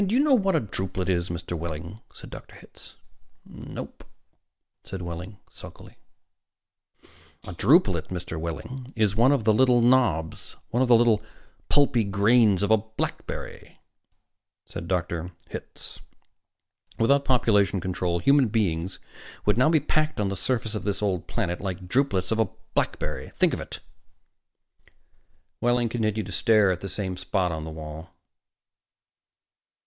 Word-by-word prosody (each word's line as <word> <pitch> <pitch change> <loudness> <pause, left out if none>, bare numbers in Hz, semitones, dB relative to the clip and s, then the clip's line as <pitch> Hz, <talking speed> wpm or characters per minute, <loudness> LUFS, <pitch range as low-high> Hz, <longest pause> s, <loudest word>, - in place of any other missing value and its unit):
Do 200 +4 0
you - - +4
know 295 -2 +4
what 195 -7 +3
a - - +4
drupelet 95 -4 -3
is, 85 -1 0
Mr. 85 0 -4
Wehling?" 85 +4 -6
said - - -12 0.3
Hitz. - - -15 0.5
"Nope," - - -9 0.8
said 95 -2 -7
Wehling 90 +4 -7
sulkily. - - -13 1.5
"A - - -7
drupelet, - - +3
Mr. 90 -3 -5
Wehling, 120 +11 -6
is 105 -3 +1
one 120 +5 +5
of 140 -5 +1
the 110 0 +4
little 125 +1 +4
knobs, 120 -10 +1 0.2
one 120 - +1
of 130 - +3
the 120 - +7
little 115 -2 +4 0.5
pulpy 135 -5 +3
grains 100 0 +3
of 100 - +1
a 110 - +7
blackberry," 110 +1 -6 0.9
said 85 - -7
Dr. 85 -1 -2 0.2
Hitz. - - -9 1.0
"Without 140 +5 +3
population 105 -7 +3
control, 90 -1 -1
human 140 +8 +4
beings 95 -5 -1 0.5
would 105 - +3
now 130 - +5
be 160 -1 +4
packed 155 0 0
on 100 -2 +1
this 100 -1 -3
surface 115 0 -1
of 105 - -4
this 100 0 -2
old 95 -4 -1
planet 90 -7 -2
like 95 -1 -5
drupelets 100 -5 +1
on 110 - +1
a 110 -4 +2 0.2
blackberry! - - -2
Think - - +3
of - - -3
it!" - - -8 1.8
Wehling 120 -1 +2
continued 110 -2 -1
to - - -8
stare 105 +2 +4
at 90 - -3
the 100 - -5
same 95 0 -3
spot 90 0 -1
on 80 -1 -4
the - - -6
wall. 80 +1 -8
105 Hz, 145 wpm, -26 LUFS, 90-120 Hz, 1.8 s, the